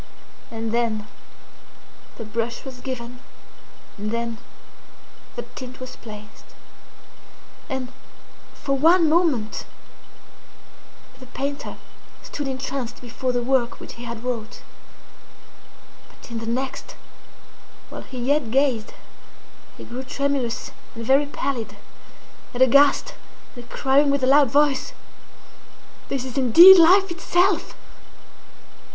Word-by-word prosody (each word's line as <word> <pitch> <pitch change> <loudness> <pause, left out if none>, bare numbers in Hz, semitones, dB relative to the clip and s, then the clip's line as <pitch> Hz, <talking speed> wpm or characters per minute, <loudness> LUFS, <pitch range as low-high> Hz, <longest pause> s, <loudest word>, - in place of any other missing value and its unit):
And 225 -1 -4
then 225 -2 -1 1.1
the 225 - -7
brush 230 +4 -4
was 255 -2 -9
given, 250 -1 -6 0.8
and 210 +1 -3
then 230 0 -3 1.0
the - - -4
tint 255 0 -9
was 255 0 -8
placed; 210 -2 -13 1.1
and, 265 -2 -4 0.6
for 275 -1 -2
one 330 +4 +5
moment, 310 -10 +1 1.5
the 255 - -13
painter 280 +2 -5 0.5
stood 290 -2 -5
entranced 260 -2 -4
before 250 +1 -3
the 245 -1 -1
work 250 -1 0
which - - -9
he 235 - -11
had 235 -1 -7
wrought; 235 -4 -5 1.5
but - - -16
in 230 - -4
the 225 - -7
next, 265 - -4 0.9
while - - -8
he 260 - -10
yet 265 +1 0
gazed, 260 -3 0 0.8
he - - -10
grew 245 +2 -7
tremulous 265 -2 -2 0.2
and 230 0 -6
very 275 +3 +3
pallid, 275 -5 -4 0.8
and 250 - +5
aghast, 280 - +4 0.4
and 245 -1 -11
crying 280 +2 +2
with 280 -1 0
a - - +5
loud 275 0 +5
voice, 285 +1 +2 1.2
'This 265 -2 -2
is 260 0 -7
indeed 345 +10 +9
Life 375 +3 +6
itself! 355 0 +1
260 Hz, 110 wpm, -23 LUFS, 235-280 Hz, 1.5 s, indeed